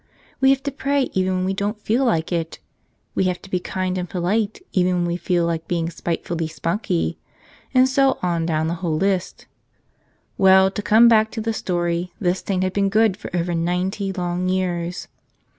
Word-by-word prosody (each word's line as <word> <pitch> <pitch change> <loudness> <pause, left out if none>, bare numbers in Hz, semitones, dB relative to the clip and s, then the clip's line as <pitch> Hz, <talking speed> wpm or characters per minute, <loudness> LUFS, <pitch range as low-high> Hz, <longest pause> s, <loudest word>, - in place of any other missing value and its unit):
We 265 - +4
have 270 0 +2
to 280 - -2
pray 280 -1 0
even 185 0 +1
when 185 0 0
we 190 - 0
don't 205 +2 -2
feel 230 +5 +1
like 165 -8 0
it; 165 -2 -2 0.6
we 190 - +1
have 180 -1 -1
to 195 - -13
be 180 - +1
kind 185 0 -2
and 180 - -4
polite 200 +4 -1
even 180 -1 +2
when 175 -1 0
we 170 0 -1
feel 175 0 0
like 165 -1 -2
being 170 -1 -1
spitefully 165 -1 -3
spunky; 160 - -2 0.5
and 255 0 +5
so 270 0 +2
on 170 -2 0
down 160 -1 0
the 165 - -1
whole 165 -4 0
list. 190 +1 -1 0.9
Well, 190 0 +6
to 210 - -4
come 220 +3 +6
back 220 -1 +5
to 225 - -3
the 225 +1 -1
story, 175 -2 -2
this 180 -1 0
saint 185 -2 -1
had 185 0 -1
been 200 -1 +1
good 215 -1 +3
for - - -8
over 175 0 -1
ninety 180 +4 -1
long 180 0 -2
years. 180 -2 -2
185 Hz, 195 wpm, -22 LUFS, 175-205 Hz, 0.9 s, Well